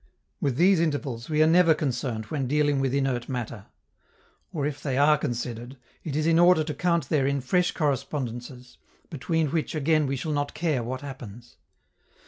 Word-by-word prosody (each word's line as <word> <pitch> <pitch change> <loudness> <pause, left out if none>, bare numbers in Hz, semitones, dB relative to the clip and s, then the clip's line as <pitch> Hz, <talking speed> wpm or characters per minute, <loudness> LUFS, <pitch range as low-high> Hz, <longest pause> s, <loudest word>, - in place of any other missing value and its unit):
With 135 -4 0
these 180 +4 +4
intervals 145 -7 -2
we 155 0 +3
are - - +4
never 165 -1 +5
concerned 125 -6 -2
when 135 +2 -3
dealing 145 0 +2
with 135 -1 0
inert 135 -3 -1
matter; 120 -5 -5 0.8
or, 145 -4 -2
if 145 -1 -4
they 135 -3 -2
are 145 +2 +5
considered, 120 -1 -4 0.3
it 150 -4 -4
is 155 0 0
in 165 0 +4
order 175 -2 +5
to 150 0 -4
count 170 -5 0
therein 140 -2 +1
fresh 180 +8 +1
correspondences, 130 -4 -4 0.3
between 160 +1 -1
which 160 0 -2
again 155 0 +2
we 135 - -1
shall 150 +4 -3
not 145 0 -2
care 155 -6 0
what 130 +3 -5
happens. 120 -4 -10
140 Hz, 170 wpm, -26 LUFS, 125-155 Hz, 0.8 s, never